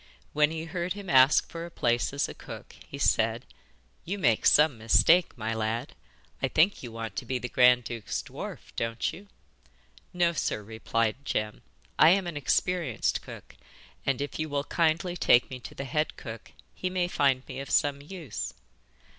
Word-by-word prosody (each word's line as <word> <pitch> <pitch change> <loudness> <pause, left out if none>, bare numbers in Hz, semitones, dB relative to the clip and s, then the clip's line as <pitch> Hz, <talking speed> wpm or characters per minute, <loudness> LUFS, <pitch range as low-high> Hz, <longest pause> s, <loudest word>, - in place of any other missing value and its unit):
When 150 0 +4
he 160 0 -5
heard 175 +1 -3
him 200 -2 -6
ask 130 +2 +6
for 165 0 -7
a 170 - -7
place 120 -7 0
as 140 +1 -1
cook, - - -10
he - - -8
said: - - +1 0.6
'You 195 +4 -4
make 120 - +2
some 150 -2 +5
mistake, 115 +12 +4
my 115 0 -2
lad. 110 +4 -2 0.5
I - - +2
think 180 +6 +2
you 120 - -7
want 115 0 -6
to - - -2
be 130 +1 -1
the 125 - -4
grand 125 0 +5
duke's 115 -3 -4
dwarf, - - -9
don't 115 0 -2
you?' 200 +4 -12 0.8
'No, 175 -1 +2
sir,' 120 -7 -2
replied 110 +1 -1
Jem. 105 -5 -2 0.4
'I 155 - +8
am 190 +1 +3
an 170 -2 -5
experienced 145 - 0
cook, - - -12 0.5
and 135 -1 0
if 145 - -4
you 155 0 -2
will 140 -1 -1
kindly 170 +3 0
take 125 -8 +4
me 130 - -6
to - - -10
the 140 - -5
head 150 +4 -1
cook 115 -2 -9 0.2
he 185 - -3
may 180 -1 0
find 135 -6 +1
me - - -6
of 135 - -7
some 140 -1 +2
use. 155 - -6
140 Hz, 180 wpm, -28 LUFS, 120-170 Hz, 0.8 s, I